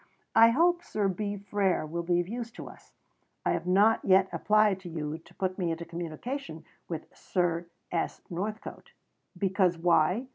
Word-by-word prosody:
I 225 +1 +8
hope 345 +7 +3
Sir 210 -9 -1
B. 205 +2 -2
Frere 195 -4 0
will 170 +3 -3
be 175 +1 +1
of 175 - -1
use 235 +2 -4
to - - -8
us. - - -14 0.5
I - - +3
have 175 +1 -2
not 205 +5 +4
yet 190 0 +4
applied 210 -2 +3
to 185 -2 -9
you 155 -1 -4
to 175 - -20
put 185 0 -2
me 175 -2 0
into 165 +1 -3
communication 170 - -6 0.2
with 165 -2 -4
Sir 175 -2 -1 0.2
S. 170 - -1
Northcote. 210 +5 -6 0.4
Because 185 -2 +2
why? 175 +6 +3
185 Hz, 170 wpm, -29 LUFS, 170-210 Hz, 0.5 s, I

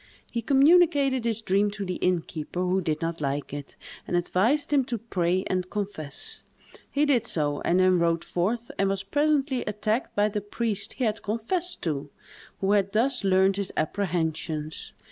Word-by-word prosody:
He 235 - -1
communicated 280 -1 +4
his 225 -1 0
dream 200 +1 +2
to 200 - -3
the 180 -1 -3
innkeeper, 175 -1 -1
who 185 +1 +1
did 155 -1 -2
not 165 -1 -3
like 140 0 -2
it, 145 -1 -7 0.3
and 175 - +1
advised 235 - +1
him 280 -2 +4
to 245 -2 -2
pray 185 -4 0
and 185 0 -1
confess. 195 -9 -5 0.5
He 290 +1 +2
did 245 -6 +2
so, 145 -5 -1
and 175 +2 +2
then 185 -1 +4
rode 170 -1 +1
forth, 225 +7 -2
and 195 0 +3
was 195 0 -1
presently 285 +2 +1
attacked 215 +3 -1
by 205 +1 +3
the 210 0 -2
priest 205 0 -2
he - - -3
had 215 -2 0
confessed 330 - -2
to, 145 -4 -2 0.5
who 195 +1 +2
had 200 -1 +2
thus 250 +2 +1
learned 190 0 +3
his 200 -1 -3
apprehensions. 160 -3 -2
200 Hz, 170 wpm, -26 LUFS, 175-235 Hz, 0.5 s, communicated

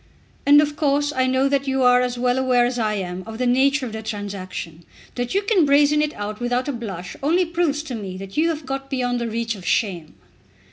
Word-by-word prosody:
"And 290 +1 +8
of 295 0 -3
course 290 0 +1
I 260 0 +2
know 260 +1 +2
that 280 0 0
you 265 -1 +1
are 250 0 +5
as 250 -1 -2
well 250 +1 +1
aware 250 -2 +3
as 245 0 -2
I 215 -2 0
am 185 -2 -4
of 220 0 -7
the 250 - -1
nature 265 +3 +3
of 225 - -7
the 220 - -5
transaction. 195 -6 -6 0.3
That 245 +6 -3
you 400 - +2
can 400 -4 +3
brazen 290 +1 +4
it 300 0 -1
out 210 +1 -5
without 245 +2 -1
a - - 0
blush 195 -7 -6
only 340 +6 +2
proves 330 -3 -1
to 270 - -7
me 195 -5 -6
that 195 0 -9
you 320 +2 +2
have 310 -3 -4
got 270 +1 -5
beyond 245 -2 -1
the 235 - -2
reach 225 0 -2
of 195 -4 -10
shame!" 175 -5 -1
250 Hz, 235 wpm, -22 LUFS, 220-285 Hz, 0.3 s, And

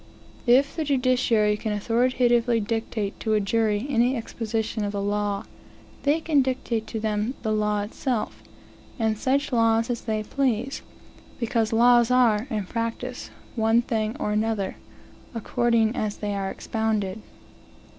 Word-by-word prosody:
If 265 +4 +4
the 320 - -1
judiciary 250 -6 +2
can 215 0 -3
authoritatively 240 +2 +2
dictate 220 -1 -3
to 220 -1 0
a - - +3
jury 210 +2 +1
any 250 -1 +2
exposition 225 -1 -3
of 205 0 -2
the 200 - -2
law, 205 0 -1 0.6
they 290 +3 +2
can 305 -3 +3
dictate 250 -4 -2
to 220 - -4
them 215 +3 -1
the 220 - 0
law 210 -1 +1
itself, 235 +2 -3 0.6
and 220 -3 +1
such 275 +5 0
laws 230 0 +3
as 235 - -3
they 215 -2 -2
please; 260 +1 -1 0.6
because 230 -2 0
laws 240 +1 +5
are, 245 -2 +3
in 210 -4 -2
practice, 230 +4 -4 0.3
one 225 +1 +3
thing 220 +1 -2
or 210 - -1
another, 215 -2 -1 0.6
according 230 0 +1
as 210 -1 -2
they 205 -1 -3
are 195 -1 -2
expounded. 220 -2 -2
225 Hz, 140 wpm, -25 LUFS, 215-245 Hz, 0.6 s, laws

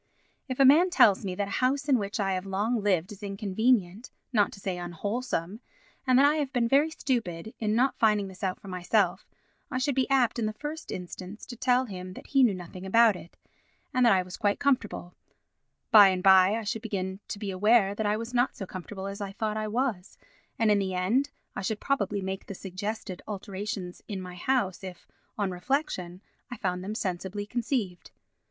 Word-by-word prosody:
If 255 -1 -4
a 275 - +7
man 320 +7 +7
tells 220 - +5
me 185 -2 -3
that 200 +1 -2
a - - -7
house 275 +3 +1
in 265 -4 +4
which 200 +2 -4
I 195 -2 +1
have 185 +1 -3
long 210 +4 0
lived 185 -3 +1
is 205 - -11
inconvenient, 205 +1 0 0.2
not 210 -3 +3
to - - -11
say 185 -2 -3
unwholesome, 195 +2 -3 0.5
and 255 -1 +5
that 275 - +6
I 295 +2 +4
have 285 -3 -1
been 245 -3 +1
very 280 +6 +4
stupid 225 - -3
in 215 -1 0
not 255 +3 +2
finding 210 -3 +3
this 190 +2 -12
out 185 -1 -1
for - - -13
myself, 180 -2 0 0.4
I 255 - -2
should 275 +2 +1
be 265 +1 0
apt 250 -4 +2
in 220 - 0
the 215 - -3
first 300 +7 -6
instance 185 +3 -7
to 240 - -8
tell 250 +2 +2
him 185 -4 -7
that - - -11
he 275 -2 +2
knew 230 -6 +4
nothing 180 +1 -9
about 225 +2 +5
it, 175 -1 -12 0.6
and 255 -2 +3
that 235 - +6
I 185 -1 +3
was 180 0 -9
quite 205 -1 +1
comfortable; 230 -10 0 0.8
by 210 -3 +10
and 185 -1 0
by, 190 +1 +6
I 225 - -3
should 215 +1 -3
begin 190 -4 -3
to - - -5
be 200 -1 -4
aware 200 +1 +4
that 210 +1 -2
I 210 +1 +1
was 230 +2 -6
not 245 +1 +2
so 195 - -6
comfortable 190 +1 -7
as 200 +1 -6
I 200 -1 -4
thought 215 +1 -2
I 215 0 -2
was, 220 -4 -2 0.4
and 225 -2 +3
in 205 - +4
the 190 -2 -2
end 230 +11 +1 0.3
I - - -3
should 210 +2 -2
probably 205 -7 -1
make 190 0 -5
the 200 - -6
suggested 195 +1 -5
alterations 195 -2 -5
in 200 -2 -4
my 180 -1 -7
house 195 -1 -1
if, 185 -2 -9 0.3
on 200 -3 0
reflection, 185 - -2 0.3
I 245 - -6
found 180 -2 -2
them 210 +3 -4
sensibly 190 0 -3
conceived. 220 -5 -3
205 Hz, 210 wpm, -28 LUFS, 190-240 Hz, 0.8 s, by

